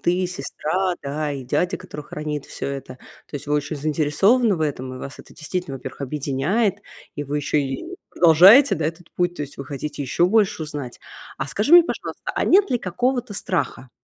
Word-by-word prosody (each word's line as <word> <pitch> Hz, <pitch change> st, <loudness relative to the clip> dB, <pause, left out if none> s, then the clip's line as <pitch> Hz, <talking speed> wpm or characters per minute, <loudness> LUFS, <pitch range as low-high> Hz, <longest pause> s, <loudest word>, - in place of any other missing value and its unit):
ты, 180 Hz, +1 st, +1 dB
сестра, 180 Hz, +3 st, -2 dB
да, 145 Hz, +1 st, -2 dB
и 135 Hz, -2 st, -6 dB
дядя, 180 Hz, +8 st, 0 dB
который 150 Hz, -, -9 dB
хранит 150 Hz, -1 st, -5 dB
всё -, -, -6 dB
это. 135 Hz, -2 st, -6 dB, 0.3 s
То 145 Hz, -, -5 dB
есть 140 Hz, -, -10 dB
вы 150 Hz, -, 0 dB
очень 150 Hz, +1 st, -1 dB
заинтересованы 165 Hz, -, +2 dB
в 160 Hz, -, -2 dB
этом, 130 Hz, -3 st, -3 dB
и -, -, -8 dB
вас 140 Hz, +2 st, -8 dB
это -, -, -14 dB
действительно, 155 Hz, -2 st, -4 dB
во-первых, 130 Hz, +1 st, -9 dB
объединяет, 150 Hz, -, 0 dB, 0.4 s
и 145 Hz, -, -4 dB
вы 145 Hz, +1 st, -3 dB
еще 150 Hz, +1 st, +1 dB
и 135 Hz, -1 st, -4 dB, 0.2 s
продолжаете, 185 Hz, -, +7 dB
да, 155 Hz, -1 st, -1 dB
этот 165 Hz, +1 st, -6 dB
путь. 175 Hz, 0 st, 0 dB
То -, -, -3 dB
есть 145 Hz, -1 st, -9 dB
вы 140 Hz, -, -6 dB
хотите 145 Hz, +2 st, -5 dB
еще 140 Hz, +5 st, +1 dB
больше 200 Hz, -3 st, +2 dB
узнать. 145 Hz, -5 st, -6 dB, 0.4 s
А 135 Hz, -, -3 dB
скажи 205 Hz, -, -1 dB
мне, 350 Hz, -, +10 dB
пожалуйста, -, -, -5 dB
а -, -, 0 dB
нет 390 Hz, -3 st, +5 dB
ли 245 Hz, -, +2 dB
какого-то 245 Hz, +4 st, -1 dB
страха? 170 Hz, -9 st, -3 dB
155 Hz, 195 wpm, -22 LUFS, 140-185 Hz, 0.4 s, мне